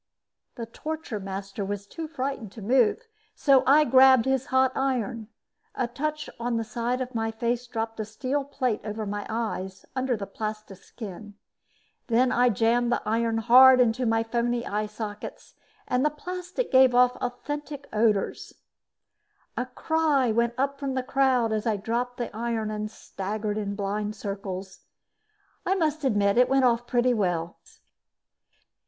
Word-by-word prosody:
The 235 - -5
torture 305 -1 -5
master 195 +1 -5
was 200 0 -4
too 320 +10 -7
frightened 265 -7 -4
to 225 - -10
move, 245 - +3 0.3
so 275 -3 +4
I 295 +3 +7
grabbed 260 -3 +6
out - - +3
his 265 -1 0
hot 260 0 +3
iron. 240 -5 -1 0.5
A 255 - 0
touch 300 +5 -3
on 235 0 -1
the 225 - -1
side 240 +2 -2
of 255 0 -4
my 225 -1 -1
face 235 +2 -2
dropped 225 -1 -4
a - - 0
steel 255 +6 -2
plate 260 -5 -2
over 215 +1 -4
my 205 0 -4
eyes, 195 -4 -4
under 260 -2 0
the 200 - -5
plastiskin. 210 0 -7 0.7
Then 245 +2 +3
I 245 +1 +4
jammed 235 +3 +2
the - - 0
iron 225 +1 0
hard 255 +3 +7
into 245 0 +2
my 225 0 +2
phony 235 +1 -1
eye 210 +1 -2
sockets 210 -1 -7 0.3
and 250 +1 +1
the 300 - +4
plastic 360 +9 -5
gave 260 -1 +6
off 250 0 +5
an - - -17
authentic 285 +3 -5
odor. 215 -2 +2 1.2
A 250 +2 -2
cry 290 -2 +1
went 235 +1 +1
up 275 +1 -1
from 275 -2 -3
the 260 - -1
crowd 255 -4 +2
as 215 +1 -1
I 215 -2 +1
dropped 240 +4 -2
the 235 -4 -5
iron 225 -1 -2
and 215 0 -3
staggered 210 0 -4
in 200 -1 -3
blind 205 +1 -2
circles. 195 -2 -6 0.8
I 380 - +1
must 310 -4 0
admit 205 -4 +2
it 250 - +5
went 270 -1 +4
off 240 0 +2
pretty 245 0 +2
well. 175 -6 -1
235 Hz, 160 wpm, -26 LUFS, 215-260 Hz, 1.2 s, I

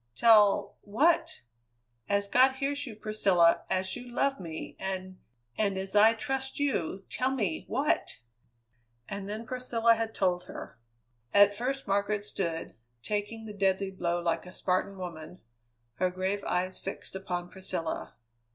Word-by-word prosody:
"Tell 210 - +5
what? 280 - +2 0.7
As 200 0 +2
God 260 +5 +5
hears 280 +1 -2
you, 225 - -7
Priscilla, 195 -6 +3
as 185 0 0
you 245 0 -8
love 275 +3 0
me, 160 -3 -7
and 185 -1 -4 0.4
and 200 -3 +1
as 190 +1 -4
I 220 +2 +7
trust 265 +4 -2
you, 195 - -1
tell 255 - 0
me 210 -12 -1
what?" 300 +4 0 0.9
And 200 0 -5
then 215 +2 -5
Priscilla 235 -2 +2
had 225 -1 -3
told 180 -1 +1
her. 115 - -9 0.6
At 205 0 +7
first 270 +5 -2
Margaret 200 +1 0
stood, 170 -5 -3 0.3
taking 210 +2 -3
the 210 - -7
deadly 195 -1 +1
blow 175 -2 -1
like 170 +1 -1
a 180 - -10
Spartan 190 +2 -1
woman, 175 -1 -7 0.6
her 185 0 +2
grave 190 +2 -2
eyes 185 +1 -1
fixed 195 - -6
upon 180 -2 -4
Priscilla. 185 -4 -4
200 Hz, 140 wpm, -29 LUFS, 185-230 Hz, 0.9 s, I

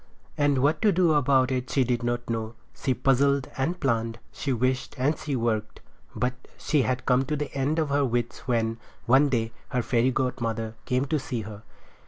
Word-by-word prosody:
And 145 -3 +2
what 150 +3 +2
to 215 - +5
do 175 -3 +3
about 135 -2 +3
it 130 0 -2
she 135 - +2
did 120 -1 0
not 120 0 -2
know. 115 -1 -3 0.2
She 130 -2 -1
puzzled 140 +1 +2
and 165 +7 -1
planned, 115 -3 0
she 140 - -3
wished 130 +1 0
and 140 +5 +2
she 150 -3 -3
worked, 110 -3 -1 0.4
but 125 +3 0 0.2
she 150 -3 +1
had 130 0 -1
come 125 +1 +3
to 150 - -1
the 150 0 -4
end 140 +3 0
of 155 -3 +1
her 140 0 +2
wits 120 -1 -2
when, 115 -2 0 0.3
one 135 +4 +5
day, 115 -3 0 0.2
her 125 -3 0
fairy 120 +1 +2
godmother 115 -4 -2
came 125 +2 +1
to 150 +2 0
see 125 -3 -4
her. 105 -1 -9
130 Hz, 195 wpm, -26 LUFS, 120-140 Hz, 0.4 s, to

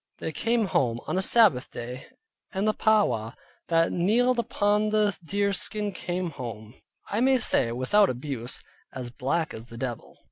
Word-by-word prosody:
They 160 - -4
came 230 +6 +1
home 125 -9 0
on 185 - -1
a - - +1
Sabbath 190 - +4
day, 125 +2 -7 0.4
and 195 +2 -1
the 215 - +3
Powaw 125 - +1 0.3
that 165 0 +2
kneeled 240 +8 +2
upon 210 -2 +1
the 210 -1 +2
deer 200 +4 0
skin 210 +2 -1
came 180 -2 -3
home 115 -5 -8 0.4
(I 210 - 0
may 260 +2 +4
say, 120 - +2
without 185 - +3
abuse) 125 -1 -4 0.3
as 125 -2 -6
black 155 +7 -1
as 115 +2 -9
the 115 - -11
devil. 120 -2 -6
175 Hz, 165 wpm, -26 LUFS, 125-210 Hz, 0.4 s, Sabbath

